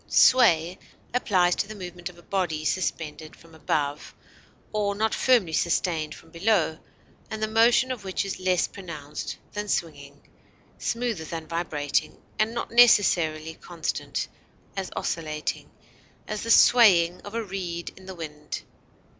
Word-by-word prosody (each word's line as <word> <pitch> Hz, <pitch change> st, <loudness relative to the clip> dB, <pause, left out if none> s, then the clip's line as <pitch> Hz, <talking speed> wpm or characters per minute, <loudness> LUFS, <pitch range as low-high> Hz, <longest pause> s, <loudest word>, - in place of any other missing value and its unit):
Sway 180 Hz, -9 st, +5 dB, 0.3 s
applies 185 Hz, -7 st, +3 dB
to 200 Hz, -, -1 dB
the 215 Hz, -, -8 dB
movement 180 Hz, -2 st, -7 dB
of 175 Hz, -, -16 dB
a 175 Hz, -, -16 dB
body 165 Hz, -6 st, -2 dB
suspended 160 Hz, -3 st, -2 dB
from 165 Hz, -1 st, -19 dB
above 150 Hz, -2 st, -2 dB, 0.6 s
or 205 Hz, -1 st, 0 dB
not 220 Hz, +2 st, 0 dB
firmly 230 Hz, -11 st, +3 dB
sustained 160 Hz, -2 st, 0 dB
from 165 Hz, -, -17 dB
below, 170 Hz, -2 st, +1 dB, 0.5 s
and 220 Hz, 0 st, -4 dB
the -, -, +2 dB
motion 235 Hz, +4 st, +4 dB
of 245 Hz, -5 st, -5 dB
which 190 Hz, +1 st, -2 dB
is 195 Hz, -, -4 dB
less 185 Hz, -1 st, +2 dB
pronounced 155 Hz, -7 st, -7 dB, 0.2 s
than 210 Hz, 0 st, -4 dB
swinging, 145 Hz, -7 st, -3 dB, 0.6 s
smoother 230 Hz, -8 st, -2 dB
than 160 Hz, 0 st, -5 dB
vibrating, 155 Hz, -4 st, -1 dB, 0.2 s
and 215 Hz, +1 st, +2 dB
not 235 Hz, -, -4 dB
necessarily 170 Hz, -9 st, +4 dB
constant 170 Hz, 0 st, -4 dB, 0.5 s
as 195 Hz, -2 st, -3 dB
oscillating; 155 Hz, -2 st, -3 dB, 0.6 s
as, 210 Hz, -1 st, -3 dB
the 230 Hz, -, -5 dB
swaying 185 Hz, -9 st, +6 dB
of 205 Hz, +2 st, -9 dB
a 230 Hz, -, -1 dB
reed 180 Hz, -4 st, -5 dB
in 190 Hz, 0 st, -15 dB
the 190 Hz, -, -7 dB
wind. 150 Hz, -3 st, -7 dB
180 Hz, 140 wpm, -26 LUFS, 160-210 Hz, 0.6 s, swaying